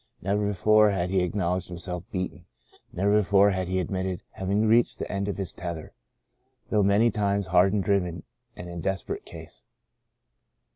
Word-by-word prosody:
Never 100 +2 0
before 105 +2 +4
had 90 -2 -1
he 95 -1 +2
acknowledged 90 0 -1
himself 90 0 -6
beaten; 90 -1 -4 0.5
never 100 +3 +2
be - - +1
fore 100 +1 +4
had 95 -1 -2
he 95 +1 -1
admitted 95 0 -3
having 100 +3 0
reached 115 +2 +3
the - - -5
end 100 0 -2
of 100 - -3
his 95 -3 -4
tether, 85 -3 -6 0.8
though 105 - +3
many 100 +4 +4
times 100 -1 0
hard 95 +3 +3
driven 90 -4 0 0.3
and 90 - -8
in 85 -1 -6
desperate 95 +1 -3
case. - - -12
95 Hz, 160 wpm, -26 LUFS, 90-100 Hz, 0.8 s, before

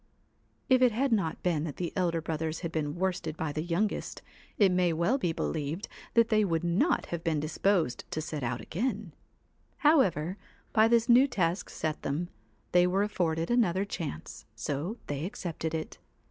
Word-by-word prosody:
If 255 -1 +4
it 250 -2 +6
had 260 +4 0
not 190 -8 0
been 165 -4 +1
that 150 - -5
the 175 -2 -4
elder 170 -3 +1
brothers 160 0 -3
had 170 -2 -3
been 150 -2 -2
worsted 175 -3 -2
by 160 -2 -2
the 155 - -2
youngest, 175 +6 -2 0.3
it 200 -3 +5
may 180 -2 +2
well 170 - +1
be 175 - 0
believed 160 +3 -3 0.3
they 225 -2 +4
would 165 -4 0
not 185 - +2
have 170 -1 -3
been 160 -2 +1
disposed 155 -2 0
to - - -3
set 155 -1 -4
out 125 -1 -2
again; 210 - -3 0.7
however, 190 - +3 0.4
by 220 0 +6
this 230 0 +3
new 250 +3 +7
task 180 -6 -1
set 155 -1 -3
them, 160 +5 -2 0.4
they 180 0 +5
were 190 +3 +2
afforded 165 -3 -1
another 200 -6 +2
chance, 165 - -6
so 155 - -3
they 145 0 -3
accepted 165 -3 -4
it. 155 - -5
175 Hz, 170 wpm, -29 LUFS, 160-210 Hz, 0.7 s, new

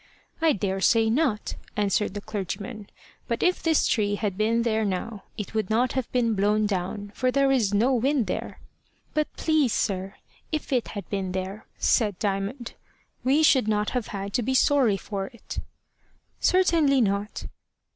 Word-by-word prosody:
"I 325 -2 +4
daresay 205 +3 +2
not," 245 -5 0 0.2
answered 205 0 +1
the 205 - -4
clergyman; 205 +1 -5 0.4
"but - - -1
if 365 0 +2
this 320 -2 +3
tree 205 -3 +1
had 205 -2 -2
been 225 +3 +1
there 220 -2 +1
now, 200 +2 -3
it 210 -1 -5
would 220 -3 -1
not 235 +3 +2
have 260 -3 -2
been 235 -3 +2
blown 210 +1 +2
down, 200 +1 -3
for 255 - 0
there 275 +1 +3
is 235 -7 +2
no 230 +6 +3
wind 260 +1 +2
there." - - -4 0.5
"But, 305 -1 0
please, 310 -7 +2
sir, 195 -1 -1 0.4
if 310 -3 -2
it 245 -3 +1
had 200 - -6
been 190 -2 -2
there," 190 +3 -5
said 210 -6 +2
Diamond, 205 +4 -3 0.5
"we 280 +5 +3
should 260 -7 +5
not 210 -1 +1
have 250 -4 -2
had 200 0 -5
to 245 - +1
be 260 +3 0
sorry 260 -7 +4
for 195 -1 -4
it." 235 - -8 0.8
"Certainly 330 -7 +3
not." 200 0 -1
220 Hz, 165 wpm, -26 LUFS, 200-255 Hz, 0.8 s, should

